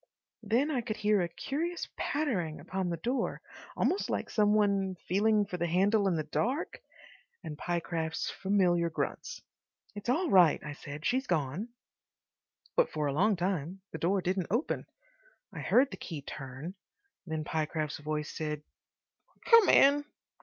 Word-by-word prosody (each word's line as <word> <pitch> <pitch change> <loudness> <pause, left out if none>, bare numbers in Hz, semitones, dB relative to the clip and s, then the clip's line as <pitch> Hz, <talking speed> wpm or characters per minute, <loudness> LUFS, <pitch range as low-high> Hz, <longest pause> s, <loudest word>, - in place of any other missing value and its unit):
Then 235 +8 +1
I 260 -5 0
could 220 -2 -4
hear 210 -2 +3
a 175 - -1
curious 320 - -3
pattering 210 - -1
upon 185 +4 -3
the 170 - -2
door, 250 +7 -1 0.4
almost 385 - +1
like - - -2
some 210 -1 +3
one 200 -3 +2
feeling 210 +3 +3
for 185 -2 -5
the 175 0 0
handle 200 +4 +3
in 185 - +2
the 155 - -1
dark, 245 - -2 0.6
and 150 - -6
Pyecraft's 165 -1 -2
familiar 180 -4 +2
grunts. 485 - -4 0.5
"It's 205 +3 -6
all 325 +5 +1
right," 180 -5 +6
I 150 - -5
said, 145 +1 -8
"she's 260 +1 +1
gone." 160 - -1 1.1
But - - +4
for 150 - -2
a 140 - 0
long 200 +8 +3
time 180 0 -2
the 160 - -6
door 185 +2 +1
didn't 185 -1 0
open. 235 - -1 0.7
I - - -6
heard 265 +2 +3
the - - -6
key 155 -5 -7
turn. 135 +5 -7 0.5
Then 160 -1 -2
Pyecraft's 155 0 -2
voice 150 0 -3
said, 150 -2 -3 0.9
"Come 460 -3 +8
in." 285 +1 +6
185 Hz, 155 wpm, -31 LUFS, 160-220 Hz, 1.1 s, Come